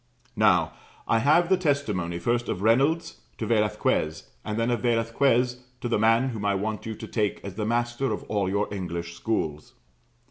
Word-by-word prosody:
Now, - - +3 0.3
I 115 - +3
have 155 +8 +4
the 190 +1 +3
testimony, 110 - -1
first 120 +7 -1
of 95 - -3
Reynolds 140 +9 +2 0.2
to - - -3
Velasquez, 105 -8 0
and 105 0 -3
then 115 +1 +1
of 120 -3 0
Velasquez 120 +1 +1 0.2
to - - -3
the 115 - +1
man 115 +4 +3
whom 110 -4 -5
I 100 -1 +1
want 105 +3 -3
you 110 - -4
to - - -8
take 105 -3 -1
as 100 - -6
the 105 +2 -3
master 120 +3 0
of - - -3
all 100 -3 -1
your 100 +2 0
English 85 -3 -4
schools. 80 -7 -3
115 Hz, 180 wpm, -26 LUFS, 100-125 Hz, 0.3 s, have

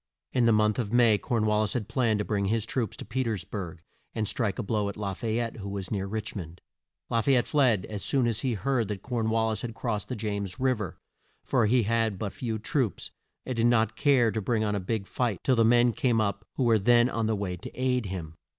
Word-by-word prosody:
In 125 -3 +3
the - - +5
month 105 0 +3
of 110 -4 -2
May, 115 -3 +5
Corn 115 -3 0
wal 105 0 +2
lis 105 - 0
had 115 -5 -2
planned 115 -5 +1
to 105 - -2
bring 100 -2 0
his 110 +2 0
troops 115 -3 -2
to - - -8
Pe 120 +5 -2
ters 110 -7 -2
burg 90 -4 -7 0.3
and 110 -2 -1
strike 110 -3 -1
a 125 - -2
blow 105 -1 0
at 100 - -7
La 100 -2 -3
fay 110 +3 -2
ette, 120 -1 -2
who 100 -2 -6
was 100 -2 -5
near 100 -2 -1
Rich 110 +2 -4
mond. 85 -3 -7 0.5
La 115 - +2
fay 135 +3 +3
ette 120 - +2
fled 125 -10 +2
as 105 -2 -5
soon 135 -3 +2
as 115 -2 0
he 130 -4 -1
heard 120 +2 0
that 100 -2 -5
Corn 115 -3 -1
wal 110 0 +2
lis 110 - -3
had 115 -2 -5
crossed 110 -4 -3
the 125 - -2
James 100 -3 -4
Riv 130 -4 +1
er, 95 - -5 0.5
for 115 - +2
he 120 +2 +3
had 110 -1 +1
but 100 0 -4
few 115 -3 -3
troops 110 - -2 0.3
and 130 - -3
did 115 +1 +3
not 110 -2 +2
care 125 -4 +3
to 110 - -2
bring 110 +2 0
on 105 -1 0
a 100 - 0
big 100 +2 -2
fight 115 -2 -1
till 130 - +3
the 115 - +4
men 120 +1 +4
came 115 +1 +1
up 105 +1 -1
who 130 - 0
were 115 -2 +4
then 120 +3 +5
on 115 -3 -1
the 110 - +1
way 100 -3 -3
to - - -8
aid 125 -4 +1
him. 85 -4 -6
110 Hz, 260 wpm, -28 LUFS, 100-120 Hz, 0.5 s, the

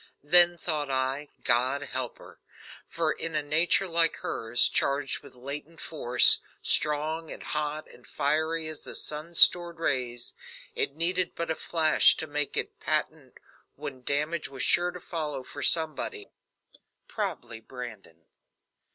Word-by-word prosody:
Then 175 +3 +7
thought 155 -4 -3
I, 135 +2 -2 0.2
"God 130 +3 +1
help 130 -3 -5
her," - - -17 0.5
for 165 -2 -2
in 160 +1 -4
a 150 - -1
nature 165 +6 +2
like 165 -1 +3
hers, 115 +2 0
charged 140 0 -1
with 140 -3 -16
latent 145 +5 -8
force, 125 -6 +6 0.2
strong 155 +2 -1
and - - -9
hot 150 0 -4
and - - -19
fiery 160 +2 -1
as 155 -1 -3
the - - -6
sun's 155 +3 -6
stored 175 -1 +6
rays, 125 -6 -3 0.4
it 445 -2 -2
needed 180 +2 0
but 170 -1 -4
a - - -1
flash 160 -2 +2
to - - -4
make 150 -1 -2
it - - -4
patent, - - -3 0.4
when 140 -3 -9
damage 150 +5 -2
was 135 - -6
sure 175 0 +2
to 180 - -9
follow 150 -6 -5
for 145 - -10
somebody 155 -9 +1 0.8
probably 115 - -6
Brandon. 110 -9 -12
150 Hz, 145 wpm, -26 LUFS, 135-165 Hz, 0.8 s, Then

